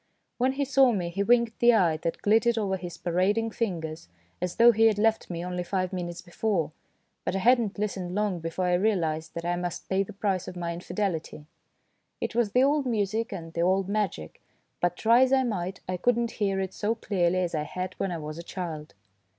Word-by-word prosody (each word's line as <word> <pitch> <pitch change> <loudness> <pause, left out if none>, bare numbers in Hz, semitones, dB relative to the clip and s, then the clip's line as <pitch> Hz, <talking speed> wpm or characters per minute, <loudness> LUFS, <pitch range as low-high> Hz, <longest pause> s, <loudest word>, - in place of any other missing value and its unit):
When 260 +2 +2
he 280 +1 -1
saw 270 -1 +5
me 180 -6 -1
he 185 +4 -3
winked 235 +1 +2
the 240 0 +6
eye 170 -6 +3
that 165 +1 -4
glittered 225 +3 +3
over 200 -3 0
his 175 -2 -7
parading 200 +6 +1
fingers, 160 - -4 0.3
as 180 -1 -2
though 235 +1 +7
he 225 0 +4
had 215 -2 +2
left 220 +1 +1
me 170 0 -4
only 180 0 -3
five 185 +1 -2
minutes 175 -1 -4
before, 175 -2 -1 0.5
but - - -2
I - - +2
had 245 +6 +5
not 215 -3 -3
listened 190 -3 -3
long 205 -4 0
before 165 +3 -3
I 180 - +2
realised 175 -5 0
that 170 0 -4
I 175 0 +1
must 175 -1 -4
pay 190 0 +2
the 195 - -4
price 195 -3 -1
of - - -7
my 170 -1 -3
infidelity. 170 -4 -3 0.7
It - - -3
was 225 -3 +1
the 250 - +5
old 285 0 +2
music 225 +1 -1
and 165 -4 -7
the 170 - -1
old 190 +2 +2
magic, 200 - -3 0.4
but 175 0 0
try 230 +2 +5
as 260 0 +4
I 265 -1 +4
might 190 -6 -3
I 185 0 -2
could 240 +6 +2
not 235 -1 -1
hear 195 -2 -1
it 190 -1 -3
so 220 +2 -1
clearly 185 -5 0
as 175 -2 -2
I 155 - 0
had 185 +4 -4
when 195 - -1
I 170 - -2
was 155 0 -6
a - - -6
child. 165 -4 -6
190 Hz, 220 wpm, -27 LUFS, 175-225 Hz, 0.7 s, though